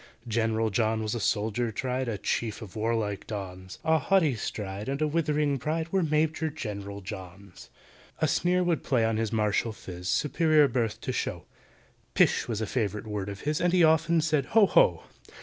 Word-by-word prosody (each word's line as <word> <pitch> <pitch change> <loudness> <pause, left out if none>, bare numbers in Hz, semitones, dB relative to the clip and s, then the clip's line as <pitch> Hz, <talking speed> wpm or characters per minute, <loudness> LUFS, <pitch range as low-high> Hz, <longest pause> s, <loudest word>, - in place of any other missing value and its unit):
GENERAL 110 -1 0
JOHN 110 +1 +1
was 110 - -2
a 120 - -2
soldier 110 +1 0
tried, 130 +3 -2
A 110 -3 -2
chief 110 +3 -2
of 100 - -11
warlike 110 -2 -1
dons; 95 -3 -7
A 160 0 +3
haughty 165 -2 +3
stride 105 -1 -5
and 140 +1 -2
a 155 - +2
withering 150 -3 0
pride 160 +4 -2
Were 190 - +3
MAJOR 155 0 +1
GENERAL 100 -8 -6
JOHN'S. 95 0 -10 0.5
A - - +2
sneer 180 +1 +2
would 175 -3 0
play 120 -4 +2
on 110 -1 0
his 110 -1 -1
martial 110 +1 +1
phiz, 90 -4 -8
Superior 155 0 +3
birth 115 -4 -1
to - - -3
show; - - -3 0.7
"Pish!" - - +3
was 110 -2 -2
a - - 0
favourite 105 -1 -2
word 105 -2 -4
of 100 0 -7
his, 150 +1 -1
And 175 0 +2
he 180 -2 +5
often 160 +1 +4
said 155 -4 +1
"Ho! 220 -2 +8
ho!" - - +3
115 Hz, 185 wpm, -28 LUFS, 105-155 Hz, 0.7 s, Ho